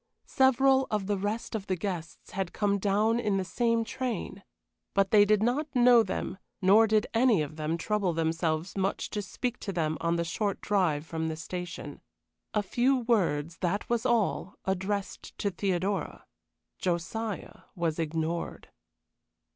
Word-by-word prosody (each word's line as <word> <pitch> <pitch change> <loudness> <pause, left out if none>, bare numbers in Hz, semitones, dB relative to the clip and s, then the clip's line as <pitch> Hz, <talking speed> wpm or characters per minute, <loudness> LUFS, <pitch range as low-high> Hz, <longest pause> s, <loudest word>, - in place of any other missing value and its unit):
Several 265 0 +4
of 210 -2 -1
the 205 +1 0
rest 205 +4 -3
of 210 -3 -4
the 185 - +1
guests 175 -2 -5
had 190 -2 -3
come 200 -1 +1
down 210 +4 +2
in 210 -4 +1
the 190 - -1
same 230 +3 +1
train, 235 -5 -4 0.5
but 195 -1 +3
they 205 -1 +7
did 210 0 +3
not 265 +6 +1
know 245 -1 +7
them, 195 -3 -3 0.2
nor 210 +3 +6
did 215 0 +3
any 225 -7 +4
of 150 +1 -7
them 155 +1 -2
trouble 205 0 0
themselves 165 +1 -1
much 195 0 -1
to 210 - -2
speak 245 +5 -4
to 200 - -4
them 160 -4 -1
on 170 0 +1
the 170 - 0
short 200 +4 -2
drive 175 -8 +1
from 160 0 -3
the 160 - -2
station. 175 +2 -6 0.5
A 210 - +2
few 250 +6 +2
words, 170 -9 +1
that 190 +3 -1
was 235 -2 +1
all, 225 -5 +1
addressed 190 +1 -3
to 200 - -1
Theodora. 190 +1 -2 0.5
Josiah 185 +4 -3
was 165 -2 -1
ignored. 160 +1 -3
195 Hz, 155 wpm, -29 LUFS, 170-220 Hz, 0.5 s, they